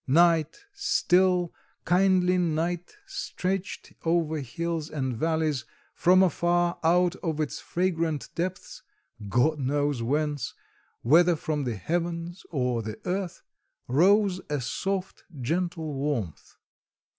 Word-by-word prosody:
Night, 165 Hz, -, +3 dB
still, 185 Hz, -, +2 dB, 0.3 s
kindly 185 Hz, 0 st, +3 dB
night 170 Hz, -, -1 dB
stretched 195 Hz, -, -4 dB
over 165 Hz, -2 st, +1 dB
hills 160 Hz, +4 st, -3 dB
and 130 Hz, -5 st, -2 dB
valleys; 160 Hz, -1 st, 0 dB, 0.3 s
from 185 Hz, +2 st, +5 dB
afar, 175 Hz, -1 st, +1 dB
out 175 Hz, +2 st, +3 dB
of 160 Hz, -4 st, -3 dB
its 155 Hz, -2 st, -2 dB
fragrant 165 Hz, -6 st, -1 dB
depths 185 Hz, +2 st, -4 dB, 0.5 s
God 145 Hz, +8 st, +2 dB
knows 145 Hz, -1 st, 0 dB
whence 145 Hz, 0 st, -1 dB, 0.5 s
whether 170 Hz, +7 st, +5 dB
from 150 Hz, -2 st, -2 dB
the 120 Hz, -3 st, -2 dB
heavens 170 Hz, -, -3 dB
or 125 Hz, -6 st, 0 dB
the 110 Hz, 0 st, -6 dB
earth 185 Hz, -1 st, -3 dB, 0.4 s
rose 185 Hz, -, +4 dB
a 145 Hz, -1 st, 0 dB
soft, 190 Hz, +9 st, -3 dB, 0.2 s
gentle 165 Hz, +3 st, -2 dB
warmth. 135 Hz, -, -3 dB
165 Hz, 110 wpm, -27 LUFS, 145-180 Hz, 0.5 s, from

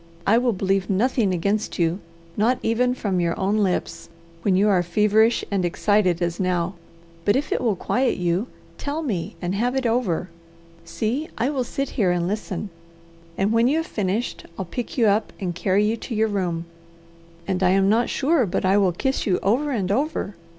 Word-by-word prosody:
I 225 Hz, +4 st, +5 dB
will 245 Hz, -1 st, +2 dB
believe 195 Hz, -1 st, 0 dB
nothing 215 Hz, +1 st, +2 dB
against 200 Hz, +5 st, -1 dB
you, 170 Hz, +2 st, +1 dB, 0.4 s
not 235 Hz, +5 st, +2 dB
even 245 Hz, +2 st, +1 dB
from 195 Hz, -7 st, -1 dB
your 170 Hz, -1 st, 0 dB
own 200 Hz, +3 st, +1 dB
lips, 195 Hz, -4 st, -1 dB, 0.3 s
when 190 Hz, +1 st, +2 dB
you 200 Hz, +3 st, +4 dB
are 190 Hz, -4 st, +4 dB
feverish 210 Hz, +6 st, +2 dB
and 195 Hz, -2 st, +1 dB
excited 180 Hz, 0 st, +2 dB
as 170 Hz, 0 st, -2 dB
now, 180 Hz, -1 st, 0 dB, 0.5 s
but 205 Hz, -, +3 dB
if 280 Hz, +3 st, -1 dB
it -, -, 0 dB
will 225 Hz, -5 st, +1 dB
quiet 250 Hz, +7 st, 0 dB
you, 180 Hz, +5 st, 0 dB, 0.3 s
tell 295 Hz, +3 st, -3 dB
me 200 Hz, -, -3 dB
and 175 Hz, +1 st, -1 dB
have 240 Hz, +6 st, 0 dB
it 265 Hz, -1 st, -1 dB
over. 225 Hz, -8 st, 0 dB, 0.6 s
See, 220 Hz, -, -2 dB
I 245 Hz, +5 st, +1 dB
will 265 Hz, -4 st, -1 dB
sit 275 Hz, +3 st, -3 dB
here 205 Hz, -8 st, +1 dB
and 175 Hz, -1 st, 0 dB
listen, 205 Hz, -1 st, -4 dB, 0.7 s
and 195 Hz, +2 st, +1 dB
when 230 Hz, +1 st, +4 dB
you 290 Hz, +5 st, +2 dB
have 325 Hz, -, -1 dB
finished 210 Hz, -, -2 dB
I'll 190 Hz, -, -3 dB
pick 240 Hz, +10 st, -5 dB
you 235 Hz, -, +4 dB
up 210 Hz, +1 st, +2 dB
and 180 Hz, -4 st, -2 dB
carry 190 Hz, +3 st, +1 dB
you 220 Hz, +2 st, +1 dB
to 230 Hz, -, -6 dB
your 220 Hz, +1 st, +2 dB
room, 175 Hz, -5 st, -2 dB, 0.8 s
and 190 Hz, -1 st, -1 dB
I 185 Hz, -, +4 dB
am 195 Hz, +1 st, +3 dB
not 225 Hz, +4 st, +2 dB
sure 280 Hz, -4 st, +2 dB
but 180 Hz, -, -1 dB
I 190 Hz, +2 st, +4 dB
will 190 Hz, -3 st, +2 dB
kiss 265 Hz, +9 st, -1 dB
you 185 Hz, -, +3 dB
over 250 Hz, +10 st, +2 dB
and 200 Hz, -8 st, -1 dB
over. 275 Hz, -3 st, -1 dB
205 Hz, 195 wpm, -23 LUFS, 185-240 Hz, 0.8 s, I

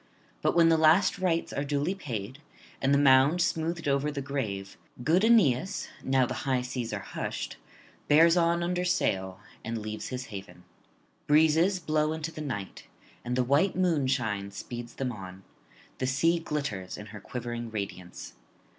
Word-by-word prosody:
But -, -, +1 dB
when 165 Hz, -1 st, +6 dB
the 165 Hz, -1 st, +4 dB
last 170 Hz, +6 st, +4 dB
rites 170 Hz, -3 st, 0 dB
are 140 Hz, -, -1 dB
duly 145 Hz, +5 st, 0 dB
paid, 125 Hz, -, -6 dB, 0.4 s
and 135 Hz, -, +2 dB
the 140 Hz, -, +5 dB
mound 140 Hz, +4 st, +5 dB
smoothed 165 Hz, -2 st, -1 dB
over 140 Hz, +1 st, +1 dB
the 145 Hz, -, -4 dB
grave, 110 Hz, -9 st, -4 dB, 0.3 s
good 170 Hz, +9 st, +3 dB
Aeneas, 190 Hz, -, +3 dB
now 130 Hz, -1 st, +3 dB
the -, -, -4 dB
high 130 Hz, -2 st, 0 dB
seas 125 Hz, -2 st, -4 dB
are -, -, -3 dB
hushed, -, -, -5 dB, 0.5 s
bears 165 Hz, +3 st, +6 dB
on 170 Hz, 0 st, +2 dB
under 180 Hz, +1 st, -1 dB
sail 95 Hz, -, 0 dB, 0.2 s
and 115 Hz, +1 st, -3 dB
leaves 110 Hz, 0 st, -5 dB
his 130 Hz, 0 st, -5 dB
haven. 95 Hz, -2 st, -9 dB, 0.6 s
Breezes 160 Hz, +5 st, +4 dB
blow 155 Hz, -2 st, 0 dB
into 160 Hz, 0 st, -4 dB
the 155 Hz, -, -8 dB
night, 115 Hz, -10 st, -5 dB, 0.4 s
and 125 Hz, 0 st, -2 dB
the 130 Hz, -, +2 dB
white 145 Hz, +10 st, +2 dB
moonshine 130 Hz, -, 0 dB
speeds 120 Hz, +4 st, -8 dB
them 130 Hz, -2 st, -2 dB
on; 95 Hz, -3 st, -9 dB, 0.6 s
the 130 Hz, -, 0 dB
sea 165 Hz, +6 st, +2 dB
glitters 140 Hz, -, -4 dB
in 105 Hz, -, -8 dB
her 105 Hz, -, -7 dB
quivering 120 Hz, 0 st, -5 dB
radiance. 100 Hz, -4 st, -6 dB
140 Hz, 160 wpm, -28 LUFS, 115-165 Hz, 0.6 s, when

